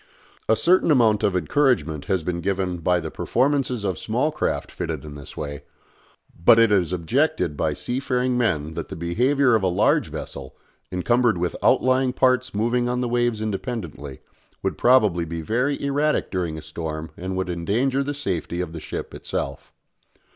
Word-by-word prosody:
A 110 - +6
certain 175 - +3
amount 115 -7 +4
of 95 - +1
encouragement 85 - +1
has 95 -4 0
been 85 +1 -2
given 95 -2 -1
by 90 +2 +2
the 80 -2 -6
performances 130 -3 0
of 95 -4 -2
small 125 +8 0
craft 150 - -2
fitted - - -4
in 75 - -8
this 70 -1 -11
way; 70 -2 -5 0.8
but 115 - +7
it 115 -2 +5
is 90 -5 +2
objected 90 - 0
by - - 0
sea 125 +1 -3
faring 125 -2 0
men 80 -11 0
that - - -5
the - - -6
behaviour 125 - +2
of 110 - +3
a 95 - +1
large 90 - +2
vessel, - - -7 0.4
encumbered 120 +4 +2
with 85 0 -2
outlying 130 0 +3
parts 130 -1 +2
moving 120 +4 0
on 125 0 -1
the 125 - 0
waves 120 -2 0
independently, 95 - -5 0.4
would - - -1
probably 105 -9 +4
be 85 0 -5
very 125 - 0
erratic 145 +2 0
during 85 -4 -2
a 80 - -8
storm 80 0 -5
and 95 +1 -4
would 95 0 -1
endanger 115 +11 0
the 145 +1 -3
safety 90 - -3
of 90 -3 -3
the 80 - -5
ship - - -6
itself. - - -5
105 Hz, 175 wpm, -23 LUFS, 85-125 Hz, 0.8 s, but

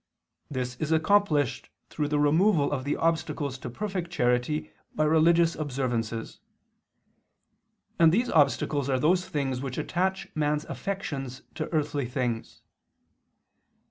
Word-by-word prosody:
This 125 -2 -3
is 155 +3 -3
accomplished 160 - +2 0.2
through 150 - -1
the 150 0 0
removal 150 +2 +3
of 135 -2 -2
the 145 - 0
obstacles 160 -4 -1
to 125 - -6
perfect 185 - -4
charity 125 0 0 0.2
by 155 - +2
religious 165 +2 +4
observances; 125 -6 -3 1.6
and 165 -1 +7
these 235 +7 +1
obstacles 145 -2 +2
are 130 -1 +2
those 180 +6 +2
things 135 -4 -2
which 135 -2 -5
attach 190 +2 -1
man's 150 0 0
affections 140 -10 -5
to - - -4
earthly 145 -4 -1
things. 120 -2 -3
150 Hz, 120 wpm, -27 LUFS, 130-165 Hz, 1.6 s, and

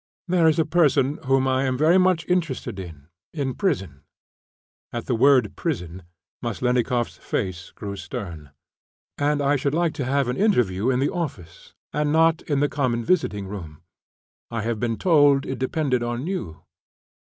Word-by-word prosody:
"There 175 -2 +3
is 160 0 +3
a 160 - +3
person, 150 -3 +2
whom 135 0 +2
I 130 +1 +1
am 130 -1 0
very 160 +6 +4
much 185 -2 +2
interested 170 - -1
in, 80 -5 -10 0.3
in 135 -4 -1
prison" 110 - -2 0.9
(at 120 - -4
the 125 - -1
word 130 +2 +4
"prison" 95 - -4 0.4
Maslennikoff's 120 +1 0
face 95 0 -4
grew 100 -1 -7
stern); 90 - -7 0.7
"and 145 0 +1
I 145 +1 +3
should 140 +2 -1
like 170 -1 +1
to 145 -4 -3
have 135 0 +1
an 125 - -2
interview 125 - +2
in 130 - +2
the 140 - +1
office, 115 - -6 0.2
and 150 0 0
not 165 +1 +3
in 145 -2 +1
the 145 - +3
common 125 -5 -1
visiting 105 - +1
room. 85 -7 -8 0.7
I 115 -2 -3
have 115 -1 -2
been 115 -1 -1
told 145 -6 +4
it 130 - -4
depended 130 -1 0
on 120 +3 -3
you." 140 - -5
130 Hz, 160 wpm, -24 LUFS, 110-155 Hz, 0.9 s, very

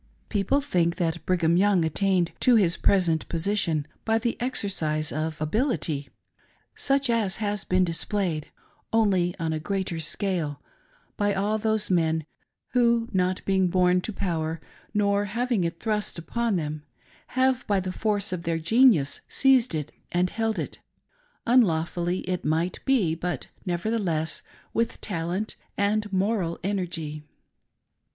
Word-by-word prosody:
People 215 +7 +1
think 175 -11 +1
that 170 -2 -1
Brigham 170 -2 +3
Young 190 -3 +3
attained 180 +1 +1
to 250 -2 +5
his 185 -6 +4
present 170 -5 +2
position 165 -3 0 0.2
by 225 0 +2
the 230 +1 -1
exercise 170 -11 0
of 155 +1 -3
ability, 155 - -1 0.6
such 275 0 +1
as 225 -5 +1
has 205 -2 -1
been 185 0 +2
displayed^ 170 -2 -1 0.5
only 190 -6 +2
on 160 -1 -1
a 155 - -2
greater 185 0 -2
scale, 160 -4 -1 0.6
by 205 -1 +1
all 210 +3 0
those 220 -2 0
men, 160 -3 +2 0.4
who, 235 -2 +2
not 185 0 0
being 190 -1 +3
born 180 0 +3
to 220 - -4
power, 165 -5 -2 0.3
nor 205 -1 +2
having 230 0 0
it 170 0 -3
thrust 210 -4 -1
upon 225 +6 -1
them, 155 -3 -3 0.6
have 260 -1 +2
by 200 -3 +2
the 185 0 -3
force 205 -1 -1
of 180 - -3
their 165 -1 -1
genius 210 - +4
seized 260 -8 +3
it 150 -2 -3 0.2
and 180 +1 +1
held 225 0 -1
it - - -4 0.4
— - - -39
unlawfully 175 -6 +2
it 180 -1 -3
might 160 +4 0
be, 230 -12 +3
buty 170 -3 -4 0.2
nevertheless, 175 -3 -1 0.3
with 230 0 0
talent 185 +2 -3 0.2
and 210 +1 +1
moral 190 -3 0
energy. 170 -6 -3
185 Hz, 140 wpm, -26 LUFS, 165-215 Hz, 0.6 s, to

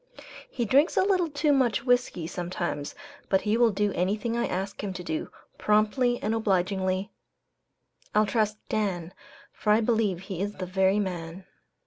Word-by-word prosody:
"He 240 - -2
drinks 275 +8 +3
a - - +5
little 370 -4 +2
too 290 0 +2
much 250 -6 +2
whiskey 245 -9 +1
sometimes, 175 -4 -4 0.3
but 190 - +3
he 215 +1 +1
will 235 0 +5
do 205 0 0
anything 210 +6 -1
I 235 0 0
ask 195 +2 -4
him 195 -2 -3
to 180 -1 -6
do, 160 -2 -3 0.3
promptly 215 +4 +2
and 215 - 0
obligingly. 190 -2 0 1.0
I'll 215 0 +5
trust 215 +1 0
Dan, 185 -5 -2 0.4
for 210 - 0
I 210 - +6
believe 220 -5 +1
he 190 -2 -5
is 205 +1 -2
the 185 - -4
very 190 +2 +2
man." 180 -2 -4
205 Hz, 160 wpm, -27 LUFS, 185-230 Hz, 1.0 s, I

